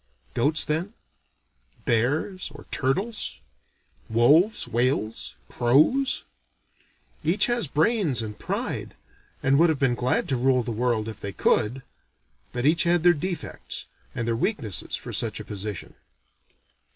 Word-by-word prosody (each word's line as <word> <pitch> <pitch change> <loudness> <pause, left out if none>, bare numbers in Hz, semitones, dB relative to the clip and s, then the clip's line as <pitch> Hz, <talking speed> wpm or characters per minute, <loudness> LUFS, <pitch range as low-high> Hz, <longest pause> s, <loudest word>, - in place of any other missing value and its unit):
Goats, 145 +6 +3
then? 170 +9 -2 0.9
Bears 145 - 0
or 145 - -12
turtles? 195 - -1 0.7
Wolves, 145 - +4
whales, 120 -2 -1
crows? 155 - +3 1.0
Each 170 +7 +4
had 240 - -1
brains 160 - +2
and 105 -1 -7
pride, - - -3 0.5
and 135 +2 +4
would 170 +1 +6
have 160 - +1
been 135 -3 +2
glad 125 +1 0
to 135 - +2
rule 125 0 +2
the 115 - -4
world 115 -1 0
if 110 -2 -6
they 100 - -4
could; 125 +5 +1 0.7
but 120 +1 -3
each 160 +3 +4
had 170 -1 +3
their 175 0 +7
defects, 175 +1 -4 0.3
and 115 - -2
their 115 - +1
weaknesses 115 - -1
for - - -6
such - - +1
a - - -7
position. 105 -2 -5
135 Hz, 130 wpm, -25 LUFS, 120-175 Hz, 1.0 s, their